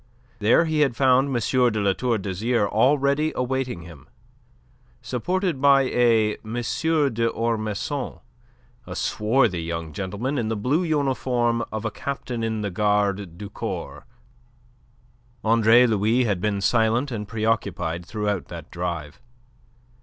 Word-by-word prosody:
There 110 +10 +4
he 160 -1 0
had 140 -5 +2
found 130 +1 +4
M. 135 - -3 0.4
de 110 - -2
La 100 -1 +2
Tour 120 +2 0
d'Azyr 105 +3 0
already 140 +7 +2
awaiting 125 -7 -2
him, 80 -6 -13 0.9
supported 135 - -2
by 140 -1 +6
a 115 -4 +2
M. 110 +1 -6
d'Ormesson, 120 -2 -1 0.7
a - - -6
swarthy 105 -4 +1
young 85 -1 -5
gentleman 105 - -3
in 115 - -1
the 110 - -1
blue 130 - +1
uniform 130 -7 0
of 110 0 -4
a 110 - -1
captain 125 -2 -4
in 110 -1 -2
the 100 -2 -3
Gardes 100 -2 0
du 100 - -7
Corps. - - -6 1.4
Andre 115 +2 +5
Louis 110 +2 +2
had 100 -6 -1
been 100 -1 -1
silent 115 +5 +2
and 105 -3 -4
preoccupied 110 -6 -1
throughout 105 -1 -3
that 85 -2 -9
drive. 85 -4 -5
115 Hz, 130 wpm, -24 LUFS, 105-130 Hz, 1.4 s, by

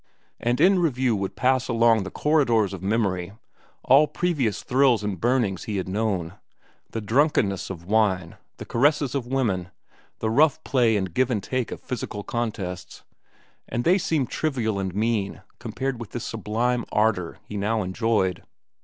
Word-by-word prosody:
And 120 +3 0
in 185 +4 +5
review 130 -8 +1
would 95 -1 -3
pass 130 0 +2
along 115 -2 +3
the 95 - -5
corridors 120 -10 +2
of 95 - -7
memory 95 -3 -1 0.5
all 140 +4 +6
previous 150 - -1
thrills 125 -4 +3
and 100 -5 -3
burnings 120 -7 +1
he 105 -2 -3
had 95 - -3
known,—the 100 +2 -5
drunkenness 110 - +1
of 85 -3 -7
wine, 95 -5 +1 0.2
the - - -8
caresses 145 +2 +2
of 135 -4 -2
women, 110 -10 -1 0.5
the 110 - -1
rough 155 +5 +3
play 120 -5 +2
and 95 -4 -3
give 130 0 +2
and 110 -6 -1
take 130 0 -2
of - - -7
physical 105 -5 -5
contests,—and 110 +1 -6
they 180 +6 +4
seemed 155 -8 -1
trivial 120 -9 -1
and 95 -1 -3
mean 105 -2 -1 0.2
compared 135 -1 -3
with 115 - -9
this 120 - -4
sublime 115 +3 -1
ardor 105 -5 +1
he 105 - -9
now 105 +2 0
enjoyed. 95 -2 0
115 Hz, 155 wpm, -24 LUFS, 100-130 Hz, 0.5 s, all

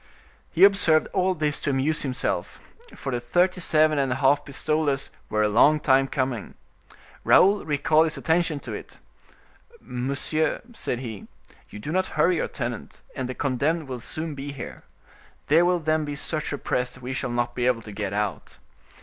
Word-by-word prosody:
He 175 - +2
observed 195 -6 +5
all 185 0 +1
this 150 -2 -1
to - - -2
amuse 140 +3 +1
himself, 130 -2 -2 0.4
for 135 - -5
the 120 - -1
thirty 180 +9 +1
seven 155 -2 +3
and 135 -2 0
a - - +1
half 135 +2 +3
pistoles 145 0 -1 0.2
were 110 0 +1
a - - +3
long 135 +9 +5
time 135 -2 +3
coming. 130 -6 -3 0.7
Raoul 200 +2 +5
recalled 155 +1 +3
his 155 -1 -3
attention 160 +1 +1
to - - -7
it. - - -9 0.8
"Monsieur," 140 +5 -1
said 125 - -3
he, 110 -6 -7 0.4
"you - - -9
do 125 +9 -6
not 185 +2 +1
hurry 170 +3 +3
your - - -1
tenant, 120 -3 -6
and 130 -2 -3
the 130 - -4
condemned 145 +4 -1
will 130 -2 -5
soon 155 +6 -4
be 140 0 -6
here. 135 -4 -8 0.6
There 165 +4 +4
will 180 0 +3
then 155 -1 0
be 145 -1 -4
such 155 +1 -2
a 145 - -2
press 125 -1 -2
we 130 +1 -5
shall 130 -1 -2
not 120 0 -1
be 120 0 0
able 120 -3 +1
to 105 - -9
get 100 -1 -4
out." 105 0 -3
140 Hz, 180 wpm, -25 LUFS, 125-155 Hz, 0.8 s, observed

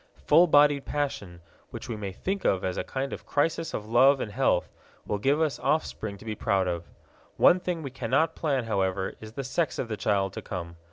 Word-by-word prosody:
Full 170 +4 +6
bodied 145 -2 +5
passion, 105 -12 -3 0.3
which - - -8
we 115 - -4
may 100 -2 -5
think 190 - -3
of 95 - +1
as 90 -1 -2
a - - -2
kind 135 +1 -4
of - - -9
crisis 165 +3 0
of 105 - -4
love 130 +4 +5
and 105 - -4
health, - - +1 0.4
will 105 - -2
give 140 +7 +2
us 155 -3 0
offspring 110 -9 -1
to 105 - -14
be 110 - -3
proud 100 -3 0
of. 85 -1 -3 0.5
One 180 - +6
thing 175 -3 -3
we 135 - -5
cannot 135 +6 +1
plan, 140 -7 -1
however, 95 -3 -1
is 110 0 -10
the 135 - -4
sex 150 +4 -1
of 120 - -3
the 110 - -3
child 95 -3 0
to - - -6
come. 85 -3 -6
120 Hz, 215 wpm, -27 LUFS, 100-145 Hz, 0.5 s, Full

